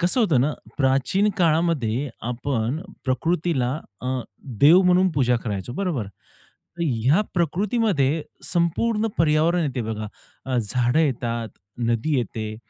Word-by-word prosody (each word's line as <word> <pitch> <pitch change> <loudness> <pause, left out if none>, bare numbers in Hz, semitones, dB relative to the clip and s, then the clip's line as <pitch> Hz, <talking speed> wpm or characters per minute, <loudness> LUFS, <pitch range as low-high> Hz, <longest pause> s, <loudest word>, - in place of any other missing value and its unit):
कसं 180 +8 +2
होतं 165 - +3
ना, 145 +4 +1 0.3
प्राचीन 135 +9 +2
काळामध्ये 155 -7 +1 0.2
आपण 125 +2 -2 0.2
प्रकृतीला 145 -1 0 0.3
अ, 130 0 -2 0.4
देव 165 +6 +8
म्हणून 180 +1 +4
पूजा 125 -5 +2
करायचो, 105 +1 -4
बरोबर? 155 - -2 0.7
तर - - -1
ह्या 130 - +2
प्रकृतीमध्ये 175 - +1 0.2
संपूर्ण 210 +6 0
पर्यावरण 165 +2 +3
येते 135 -4 -2
बघा. 110 -1 -4 0.4
अ, 130 -1 -1
झाडं 120 +5 +1
येतात, 120 -6 -1 0.3
नदी 120 +5 0
येते 110 -2 -4
140 Hz, 120 wpm, -23 LUFS, 120-170 Hz, 0.7 s, देव